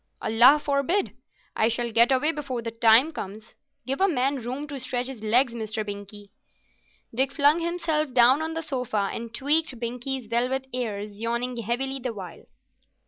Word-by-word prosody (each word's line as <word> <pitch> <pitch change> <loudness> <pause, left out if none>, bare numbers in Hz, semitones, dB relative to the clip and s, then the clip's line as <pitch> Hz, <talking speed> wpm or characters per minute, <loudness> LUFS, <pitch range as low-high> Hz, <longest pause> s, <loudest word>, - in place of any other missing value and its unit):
"Allah 240 +6 +6
forbid! 295 +7 0 0.4
I 220 - +3
shall 235 +1 -1
get 235 +3 +5
away 270 +4 +3
before 270 -6 -5
that 230 0 -7
time 235 +7 +6
comes. 215 -6 -8 0.3
Give 270 +6 -2
a 390 - +5
man 275 -4 0
room 255 +5 -4
to 285 -2 -7
stretch 250 -1 -2
his 255 -4 -6
legs, 235 +3 +2
Mr. 220 -2 -4
Binkie." 205 0 -8 0.8
Dick 265 +3 +1
flung 295 +3 +3
himself 330 -4 -1
down 250 +4 +5
on 320 0 -3
the 325 - -3
sofa 250 -9 -2
and 230 0 -5
tweaked 285 +1 0
Binkie's 245 +2 -4
velvet 250 +4 -1
ears, 210 -4 -4
yawning 235 +2 -1
heavily 250 +4 -2
the 250 -2 -4
while. 185 -4 -9
250 Hz, 165 wpm, -25 LUFS, 230-280 Hz, 0.8 s, Allah